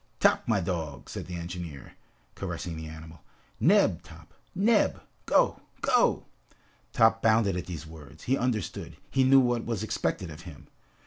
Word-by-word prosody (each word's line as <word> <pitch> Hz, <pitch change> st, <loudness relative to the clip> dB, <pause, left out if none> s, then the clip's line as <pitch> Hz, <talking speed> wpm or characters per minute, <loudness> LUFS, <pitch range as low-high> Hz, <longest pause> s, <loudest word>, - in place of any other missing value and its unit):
"Top, -, -, +3 dB
my 110 Hz, -4 st, +3 dB
dog," 85 Hz, -6 st, -4 dB
said -, -, -6 dB
the 90 Hz, -, -6 dB
engineer, 85 Hz, -4 st, -7 dB, 0.4 s
caressing 85 Hz, -2 st, -5 dB
the 80 Hz, 0 st, -6 dB
animal, 80 Hz, 0 st, -11 dB, 0.4 s
"Neb, -, -, +4 dB
Top! -, -, -15 dB, 0.2 s
Neb! 210 Hz, +2 st, +3 dB, 0.3 s
Go, -, -, +3 dB, 0.2 s
go!" -, -, +3 dB, 0.7 s
Top 110 Hz, 0 st, +4 dB
bounded 110 Hz, -4 st, +3 dB
at 90 Hz, -, -4 dB
these 85 Hz, -3 st, -6 dB
words. 80 Hz, 0 st, -13 dB
He 130 Hz, -, +2 dB
understood, 125 Hz, -5 st, -3 dB
he 135 Hz, -, +3 dB
knew 135 Hz, +1 st, +7 dB
what 120 Hz, -2 st, +1 dB
was 115 Hz, -4 st, -3 dB
expected 90 Hz, -4 st, -2 dB
of 75 Hz, +3 st, -10 dB
him. 85 Hz, -5 st, -12 dB
90 Hz, 150 wpm, -28 LUFS, 80-115 Hz, 0.7 s, knew